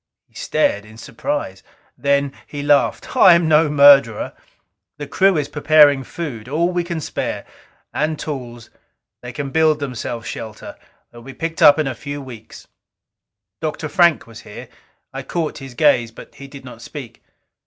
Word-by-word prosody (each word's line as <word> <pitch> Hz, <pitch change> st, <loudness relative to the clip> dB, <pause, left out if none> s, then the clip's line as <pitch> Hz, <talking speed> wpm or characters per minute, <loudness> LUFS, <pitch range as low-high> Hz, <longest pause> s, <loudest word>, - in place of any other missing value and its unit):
He -, -, -37 dB
stared 100 Hz, -, 0 dB
in 110 Hz, +1 st, -15 dB
surprise. 115 Hz, -5 st, -5 dB, 0.3 s
Then 140 Hz, -1 st, 0 dB
he 145 Hz, -1 st, -6 dB
laughed. 145 Hz, -1 st, +1 dB
"I 180 Hz, -, +7 dB
am 170 Hz, -1 st, +1 dB
no 155 Hz, 0 st, +4 dB
murderer. 140 Hz, -6 st, +5 dB, 0.6 s
The 145 Hz, -, -6 dB
crew 190 Hz, +4 st, +2 dB
is 145 Hz, -2 st, -1 dB
preparing 145 Hz, -2 st, +4 dB
food, 125 Hz, -8 st, -7 dB
all 165 Hz, +5 st, +1 dB
we 175 Hz, -1 st, -1 dB
can 170 Hz, -1 st, -4 dB
spare. 150 Hz, -, -4 dB, 0.5 s
And 155 Hz, +1 st, -1 dB
tools. 120 Hz, -7 st, -7 dB, 0.5 s
They 125 Hz, -, -8 dB
can 135 Hz, +3 st, -5 dB
build 155 Hz, -1 st, +2 dB
themselves 120 Hz, -4 st, -5 dB
shelter 110 Hz, -1 st, -8 dB, 0.4 s
they 120 Hz, -, -13 dB
will -, -, -15 dB
be 135 Hz, -1 st, -10 dB
picked 165 Hz, +2 st, -5 dB
up 145 Hz, -, +8 dB
in 155 Hz, -, 0 dB
a 135 Hz, -, -2 dB
few 145 Hz, +3 st, -7 dB
weeks." 120 Hz, -5 st, -12 dB, 0.9 s
Dr. 155 Hz, 0 st, -3 dB
Frank 170 Hz, -, +3 dB
was 115 Hz, -1 st, -13 dB
here. 105 Hz, -, -11 dB, 0.4 s
I -, -, -5 dB
caught 160 Hz, -3 st, -4 dB
his 135 Hz, -3 st, -10 dB
gaze 120 Hz, -5 st, +3 dB
but 115 Hz, -, -14 dB
he 140 Hz, -, -11 dB
did 135 Hz, -1 st, -12 dB
not 120 Hz, -2 st, -11 dB
speak. 130 Hz, -2 st, -10 dB
145 Hz, 165 wpm, -19 LUFS, 120-155 Hz, 0.9 s, up